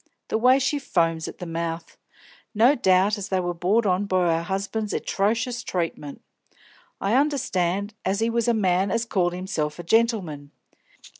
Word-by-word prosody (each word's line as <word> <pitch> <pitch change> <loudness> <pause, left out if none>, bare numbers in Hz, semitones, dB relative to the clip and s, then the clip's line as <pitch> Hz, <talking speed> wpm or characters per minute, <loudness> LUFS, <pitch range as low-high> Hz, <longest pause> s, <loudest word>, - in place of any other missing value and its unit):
the - - +1
way 255 +3 +5
she 275 +2 0
foams 165 - 0
at - - -8
the 180 - -7
mouth! 165 0 -4 0.6
No 235 +6 +5
doubt 200 -3 +2
as 195 - -6
they 190 - +1
was 175 -1 -2
brought 210 +6 +2
on 190 +1 +1
by 175 -3 +2
her 170 - -8
'usband's 210 +2 -3
etrocious 230 +4 -1
treatment. 165 -7 -4 0.8
I 200 +2 0
understand 205 - 0
as 195 +2 0
he 225 - +1
was 235 0 0
a 235 - +4
man 190 -2 +1
as 230 +4 0
called 180 -6 0
hisself 175 -5 -3
a 175 - -7
gentleman. 180 -9 0
195 Hz, 165 wpm, -24 LUFS, 175-225 Hz, 0.8 s, way